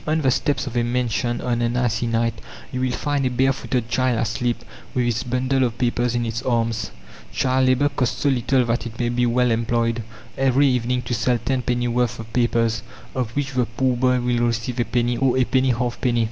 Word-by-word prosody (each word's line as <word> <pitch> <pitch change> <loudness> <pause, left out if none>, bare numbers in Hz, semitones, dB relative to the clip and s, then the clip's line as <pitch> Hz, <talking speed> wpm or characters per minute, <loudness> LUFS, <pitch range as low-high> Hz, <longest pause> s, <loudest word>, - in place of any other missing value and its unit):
On 155 +1 +2
the 135 -4 +2
steps 145 +3 0
of 130 -3 -6
a 120 - +3
mansion 120 0 -1
on 120 -1 -1
an 120 +1 0
icy 120 -1 0
night 115 0 +1 0.4
you 130 - -3
will 130 -1 +1
find 145 +2 -1
a 130 - +2
bare 130 +2 +2
footed 120 -2 -2
child 125 0 +1
asleep, 115 +1 -1 0.3
with 125 -1 +2
its 120 -1 0
bundle 130 +2 0
of 120 -2 -1
papers 120 -1 0
in 120 0 0
its 115 +1 -3
arms... 115 -2 0 0.4
child 130 0 +2
labour 130 +3 +3
costs 125 -3 -1
so - - +1
little 130 0 +2
that 115 0 -1
it 115 0 -10
may 120 -1 +1
be 120 0 +1
well 125 +1 +2
employed, 115 0 0 0.4
every 135 +1 +4
evening, 125 -1 +1
to 120 - -3
sell 120 +1 +1
tenpenny 125 0 -1
worth 120 -1 0
of 115 0 -10
papers, 115 -2 +1 0.3
of 125 -3 -1
which 140 -1 -1
the 125 -3 0
poor 125 +2 0
boy 125 +1 +2
will 120 -1 +1
receive 115 +2 -2
a 120 - +2
penny, 120 +2 0
or 130 0 +2
a 130 - +4
penny 130 +1 +2
halfpenny. 120 0 0
120 Hz, 215 wpm, -22 LUFS, 115-130 Hz, 0.4 s, every